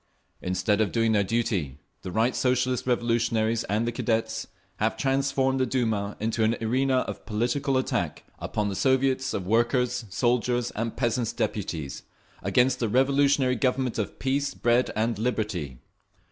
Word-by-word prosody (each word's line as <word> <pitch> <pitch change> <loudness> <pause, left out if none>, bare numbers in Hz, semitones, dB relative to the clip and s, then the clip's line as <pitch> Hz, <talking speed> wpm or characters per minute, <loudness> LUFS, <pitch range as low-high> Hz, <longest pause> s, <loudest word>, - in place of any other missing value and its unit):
Instead 100 +3 +1
of 105 - +1
doing 115 -1 +2
their 105 -2 +3
duty, 95 - -1 0.2
the - - -6
Right 115 +6 +1
Socialist 125 -1 +1
Revolutionaries 115 -2 +1
and 105 +4 0
the - - 0
Cadets 110 -1 -1 0.3
have 110 +1 0
transformed 135 -1 +1
the 130 - +3
Duma 110 -5 -1
into 110 +1 0
an 110 +2 +2
arena 130 +3 +1
of - - -6
political 125 +5 0
attack 130 - -1 0.2
upon 105 - -2
the 100 - -3
Soviets 130 +2 +2
of 95 - -3
Workers', 120 +3 +1
Soldiers' 120 +3 +1
and 115 +1 -4
Peasants' 120 -2 0
Deputies, 90 - -3 0.4
against 125 +2 +2
the 115 - 0
revolutionary 135 +1 +3
Government 125 -1 0
of 105 - -3
peace, 140 +2 -1
bread 120 +1 +2
and 110 0 0
liberty. 105 - -2
120 Hz, 145 wpm, -26 LUFS, 110-130 Hz, 0.4 s, their